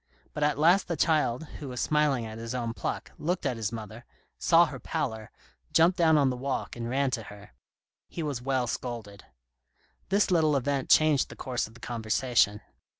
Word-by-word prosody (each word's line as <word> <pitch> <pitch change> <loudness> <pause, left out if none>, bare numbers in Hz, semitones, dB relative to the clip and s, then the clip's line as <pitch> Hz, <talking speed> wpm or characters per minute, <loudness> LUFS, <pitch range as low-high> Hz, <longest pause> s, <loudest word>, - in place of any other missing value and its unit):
But 150 - -5
at 150 -1 +2
last 175 +6 +4
the 170 - -2
child, 150 -5 +1 0.2
who 145 - -6
was 125 -1 -5
smiling 150 -6 +1
at 110 0 -8
his 115 +2 -5
own 120 -2 -2
pluck, - - -4
looked 175 +3 -2
at 125 - 0
his 110 -2 -3
mother, 110 0 -8 0.4
saw - - +5
her - - -7
pallor, 110 -1 -3 0.4
jumped 165 +3 +4
down 165 -4 +4
on 145 - +4
to - - +3
the 125 - -4
walk 135 +1 -3
and 115 -1 -5
ran 135 +1 +1
to 125 -3 -2
her. 105 - -12 0.6
He 165 - -5
was 140 -5 -3
well 130 -1 0
scolded. 115 -4 -6 0.8
This 200 0 +2
little 155 -4 +3
event 140 0 -1
changed 155 -3 +4
the - - -10
course 125 -2 -3
of 110 - -18
the - - -14
conversation. 115 -2 +1
130 Hz, 195 wpm, -28 LUFS, 115-150 Hz, 0.8 s, saw